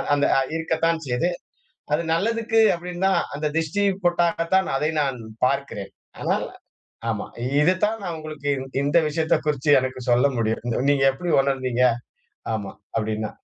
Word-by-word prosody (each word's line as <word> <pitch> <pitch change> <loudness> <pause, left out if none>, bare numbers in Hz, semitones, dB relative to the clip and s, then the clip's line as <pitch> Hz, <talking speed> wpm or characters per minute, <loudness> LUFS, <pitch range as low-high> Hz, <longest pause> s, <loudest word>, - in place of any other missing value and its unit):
அந்த 145 - +2
அ - - +2 0.2
இருக்கத்தான் 165 0 0
செய்து. 125 +8 +1 0.6
அது 155 - +2
நல்லதுக்கு 225 +5 +2
அப்படின்னுதான், 180 +2 0
அந்த 150 +2 -3
திஷ்டி 165 +6 -1 0.2
பொட்டாகத்தான் 175 +2 +2
அதை 150 +3 0
நான் 135 -3 -1 0.3
பார்க்கிறேன். 135 -8 -3 0.3
ஆனால், - - 0 0.6
ஆமா, 110 -2 -3 0.4
இது 180 +4 +4
தான் 225 +1 -2
நா 180 - -3
உங்களுக்கு 155 -2 -6
இந் 130 0 -7
இந்த 145 +4 +4
விஷயத்த 160 +1 +1
குறிச்சு 145 0 +1
எனக்கு 130 -1 -4
சொல்ல 125 +3 +4
முடியும். 110 -1 0 0.3
"நீங்க 135 -1 +2
எப்டி 175 +5 -3
உணர்ந்தீங்க?" 130 -2 0 0.7
ஆமா, 100 -3 -4 0.3
அப்படின்னா. 110 -1 -1
150 Hz, 140 wpm, -23 LUFS, 130-170 Hz, 0.7 s, இது